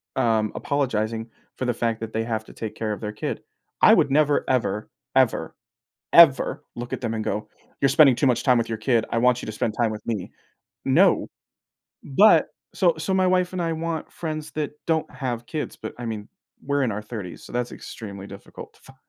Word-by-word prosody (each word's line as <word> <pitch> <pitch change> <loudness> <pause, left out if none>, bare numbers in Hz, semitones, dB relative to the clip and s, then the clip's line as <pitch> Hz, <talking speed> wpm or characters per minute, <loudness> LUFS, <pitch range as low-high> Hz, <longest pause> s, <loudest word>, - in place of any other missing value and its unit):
um, 110 -4 +2
apologizing 115 -5 -1 0.3
for 130 - -2
the 120 - +1
fact 115 -1 -1
that 110 -1 -6
they 110 0 0
have 110 -1 -3
to - - -14
take 110 -2 -6
care 110 -1 -2
of 105 - -8
their 105 -1 -3
kid. 105 - -4 0.4
I - - +8
would - - +3
never, 145 0 +3
ever, 115 -5 0 0.3
ever, - - +2 0.6
ever 165 -6 +6
look 120 0 -6
at - - -3
them 115 -2 -2
and 110 -1 -3
go, 105 +1 -3 0.3
"You're 135 - +4
spending 135 -1 +6
too 140 - +1
much 125 -2 +2
time 125 -3 +5
with 115 - -1
your 110 -1 -3
kid, 115 0 +1
I 115 - 0
want 125 +1 +3
you - - -6
to 110 - -4
spend 105 0 -2
time 115 -1 +1
with 105 -1 -7
me." 105 -6 -3 0.6
No. - - +4 0.8
But 200 +11 +5 0.3
so 175 -4 +3
so, 165 +4 -2
my 190 0 +3
wife 180 0 +2
and 185 - -3
I 165 -1 0
want 165 0 -3
friends 155 -2 -5
that 150 -2 -3
don't 160 -1 0
have 120 -3 -4
kids, 150 +4 -4
but, - - -7
I 120 - -5
mean, 110 -2 -5 0.3
we're 140 0 0
in 115 - 0
our 105 +1 -4
30s, 105 -5 -7
so - - -12
that's 120 0 -2
extremely 100 -3 -8
difficult 100 0 -11
to - - -24
fi - - -16
120 Hz, 215 wpm, -24 LUFS, 110-145 Hz, 0.8 s, I